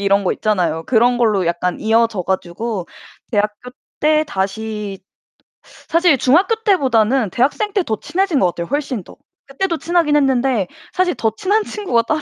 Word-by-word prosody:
이런 200 0 +2
거 - - +1
있잖아요. 175 -7 -1
그런 245 +3 +3
걸로 210 -6 +2
약간 175 +1 -1
이어져 225 -2 +2
가지고 190 +2 -3 0.4
대학교 210 +2 -2 0.3
때 305 0 +3
다시 205 0 -4 0.7
사실 335 -4 +1
중학교 345 - +3
때보다는 260 - +2
대학생 295 - 0
때 395 - +1
더 220 -8 -2
친해진 355 -2 0
것 185 - +3
같아요 170 -1 -4
훨씬 270 -7 -2
더. - - -15 0.3
그때도 335 +5 -2
친하긴 330 -3 +1
했는데 260 -7 +2 0.3
사실 365 -2 +1
더 220 -1 0
친한 415 +3 +1
친구가 320 - -1
따로 310 +6 -1
240 Hz, 335 characters per minute, -18 LUFS, 205-310 Hz, 0.7 s, 그런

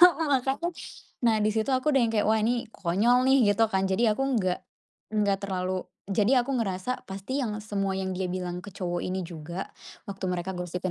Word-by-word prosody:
Heeh, 330 -3 +4
makanya, 270 +5 +1 0.6
nah 225 -2 +5
di 210 - +3
situ 220 +4 0
aku 260 +4 +1
udah 270 - +4
yang 225 - 0
kayak, 210 -1 +2
"Wah, 220 - +4
ini 235 +1 0
konyol 225 +7 +2
nih", 260 -6 +5
gitu 225 +2 +3
kan. 190 0 +2
Jadi 190 +5 +2
aku 215 +5 0 0.2
nggak 185 -4 +1 0.5
nggak 205 -2 +2
terlalu 185 -1 -2 0.3
jadi 235 +6 +4
aku 260 0 -1
ngerasa, 195 +3 -2
pasti 195 +8 -4
yang 225 -6 -1
semua 195 -2 -1
yang 190 0 -2
dia 185 0 -2
bilang 180 -1 -3
ke 195 +2 -10
cowok 175 -2 -2
ini 185 +1 -2
juga 170 +2 -6 0.4
waktu 195 -1 -6
mereka 180 0 -2
gosipin 180 +1 -3
200 Hz, 200 wpm, -27 LUFS, 185-240 Hz, 0.6 s, nah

